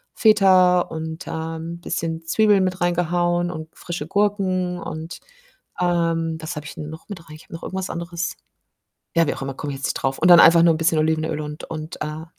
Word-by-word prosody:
Feta 185 -5 +5
und, 160 0 -6
ähm, 165 +1 -5
bisschen 165 -1 -3
Zwiebeln 205 +2 +3
mit 185 -1 -2
reingehauen 175 0 +1
und 160 -2 -7
frische 170 -4 -5
Gurken 185 -2 0
und 160 0 -7 0.6
ähm, 165 -2 0
was 160 +1 -6
habe 150 - -6
ich - - -9
'n 150 - -6
noch 160 +1 -11
mit 195 - -6
rein? 155 - -10
Ich 155 - -16
habe - - -25
noch 165 - -8
irgendwas 190 0 -4
anderes 170 0 -4 0.8
ja, 165 -1 +4
wie - - -1
auch - - -8
immer, 135 0 -4
komme 145 +2 -5
ich 135 - -6
jetzt 135 - -2
nicht - - -1
drauf 135 0 -1
und 175 - +3
dann 175 - +10
einfach 170 0 +7
nur 170 -1 +5
'n - - -2
bisschen 165 -1 +2
Olivenöl 155 0 0
und 150 +1 -6
und, 155 0 -7
äh 155 +1 -5
165 Hz, 210 wpm, -22 LUFS, 160-180 Hz, 0.8 s, dann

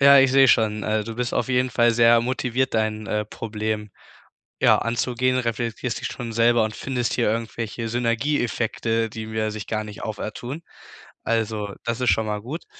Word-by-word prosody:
Ja, 140 0 +8
ich 135 -1 +5
sehe 135 0 +6
schon, 110 -3 +3
äh, 110 0 +1
du 115 +2 -6
bist 125 0 -2
auf 125 - 0
jeden 125 0 +1
Fall 120 0 +4
sehr 115 0 +5
motiviert, 130 +1 -1
dein, 110 -1 0
äh, 105 +1 -1
Problem, 105 -1 -4 0.7
ja, - - +6
anzugehen, 125 +2 0
reflektierst 115 0 -2
dich - - -3
schon 125 -2 -6
selber 115 0 +4
und 110 0 -4
findest 125 -3 -2
hier 115 -4 +2
irgendwelche 115 0 -3
Synergieeffekte, 115 -2 0
die 110 +1 -7
mir 110 0 -2
sich 105 -2 -6
gar 110 -1 -2
nicht 105 -1 -9
auftun. 120 +8 -5 0.6
Also, 110 -3 -1
das 115 +1 -1
ist 125 - +2
schon 110 - +1
mal 105 -1 -2
gut 140 +10 -6
115 Hz, 180 wpm, -23 LUFS, 110-125 Hz, 0.7 s, Ja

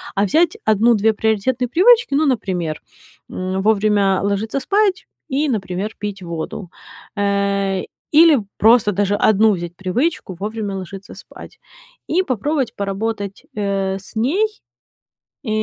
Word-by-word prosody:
А 200 - +2
взять 325 - +2
1-2 220 0 +3
приоритетные 220 +4 0
привычки, 435 - +4
ну, 300 +3 +3
например, 180 - -1 0.5
м, 185 +1 -3
вовремя 205 -2 +2
ложиться 205 +6 -1
спать 395 +4 +1 0.2
и, 285 +3 0
например, 200 -2 -3
пить 205 -2 -5
воду, 170 +1 -6 0.5
э. 200 -1 0 0.3
Или 310 -2 +6 0.2
просто 225 -1 +5
даже 205 +1 0
1 215 +1 +4
взять 175 -2 -5
привычку: 190 - -2
вовремя 210 -1 -4
ложиться 190 +1 -9
спать. - - -13 0.5
И 365 +3 +1
попробовать 275 - -1
поработать, 200 0 -4
э, 195 -2 -1
с 195 - -16
ней, 295 - +1 1.0
э, - - -7
210 Hz, 125 wpm, -19 LUFS, 195-255 Hz, 1.0 s, Или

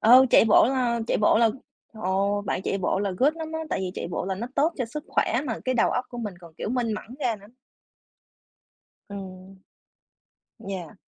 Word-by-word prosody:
ừ, 255 +4 +8
chạy - - +7
bộ 220 - +6
là 250 -3 +1
chạy - - +1
bộ 210 - +4
là, 230 -1 +5 0.4
ồ, 200 -1 0
bạn 190 - -1
chạy 195 - -1
bộ 190 0 0
là 200 0 -1
good 290 +4 +4
lắm 320 -1 -6
á, 320 - -2
tại - - 0
vì 185 -1 -2
chạy - - -4
bộ 175 - -2
là 190 - -2
nó 215 +5 -4
tốt 315 +4 +2
cho 250 - 0
sức 290 +6 -7
khỏe 235 - +1
mà 225 - -2
cái 255 0 0
đầu 235 - +3
óc 250 - -1
của 240 - -8
mình 210 -5 -4
còn, 170 -2 -14
kiểu, - - -3
minh 240 -3 0
mẫn 230 +3 -8
ra 240 -5 0
nữa. 200 0 -16 1.6
Ừm. 190 -1 -9 1.0
Yeah. 185 -5 -6
220 Hz, 210 wpm, -25 LUFS, 195-250 Hz, 1.6 s, ừ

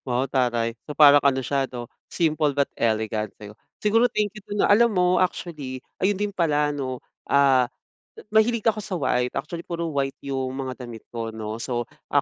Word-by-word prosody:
Wow 125 +1 +1
taray. 120 -3 0 0.2
So 150 - -6
parang 145 -1 +8
ano 135 -1 +2
siya 135 0 0
'no, 120 -1 -6 0.2
simple 155 -3 +1
but 140 - +4
elegant, 110 -1 0
'di 105 0 -10
ba? - - -28 0.3
Siguro 225 +3 +4
thank 210 -2 -1
you 215 - -10
don, 205 0 +1
ah. - - 0
Alam 235 +3 +5
mo 180 - +4 0.2
actually 155 -7 -3 0.2
ayun 195 +1 +2
din 205 0 -2
pala 150 -5 +1
'no, 130 -3 -3 0.3
ah 135 -3 +4 0.6
mahilig 220 +1 +3
ako 220 -2 +2
sa 195 -2 -4
white. 125 -5 0
Actually 165 +2 -4
puro 170 -1 -3
white 135 -1 -1
yung 135 -2 -2
mga 130 -1 -5
damit 115 -2 -10
ko, 115 -1 -3
'no. 110 0 -6
So 120 -1 -2 0.2
ah, - - +3
140 Hz, 190 wpm, -24 LUFS, 125-170 Hz, 0.6 s, parang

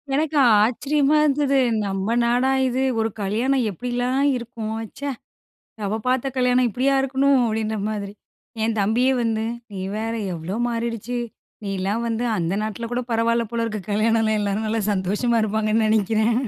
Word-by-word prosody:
எனக்கு 310 +1 0 0.3
ஆச்சரியமா 275 +6 +1
இருந்தது, 280 -1 +2 0.3
நம்ம 195 +3 -1
நாடா 245 +3 +2
இது! 260 +1 0 0.2
ஒரு 225 0 +1
கல்யாணம் 240 +7 +1
எப்டிலாம் 245 - 0
இருக்கும் 230 -2 -5 0.2
ச்சே. 285 0 -3 0.7
நம்ம 205 0 -2
பாத்த 255 +1 +1
கல்யாணம் 250 0 +3
இப்டியா 260 +5 +1
இருக்கணும் 270 0 +2
அப்டின்ற 220 0 -1
மாதிரி. 205 -2 -4 0.5
என் 225 0 0
தம்பியே 225 +6 +2
வந்து 225 -2 0 0.3
நீ 195 - -5 0.2
வேற 225 +1 -2 0.2
எவ்ளோ 170 +3 -5
மாறிடுச்சு. 235 0 -3 0.5
நீலாம் 195 +3 -2
வந்து 230 +1 -1
அந்த 170 0 -1
நாட்டுல 220 +2 -4
கூட 245 - 0
பரவாயில்ல 230 +1 +2
போல 235 -1 -1
இருக்கு, 215 -2 -3
கல்யாணலாம் 220 +1 +2
இல்லாமா, 205 +1 -1
நல்லா 225 +1 0
சந்தோஷமா 205 +5 0
இருப்பாங்கன்னு 215 +1 +1
நெனைக்குறேன். 220 +1 +2
230 Hz, 140 wpm, -22 LUFS, 215-250 Hz, 0.7 s, கல்யாணம்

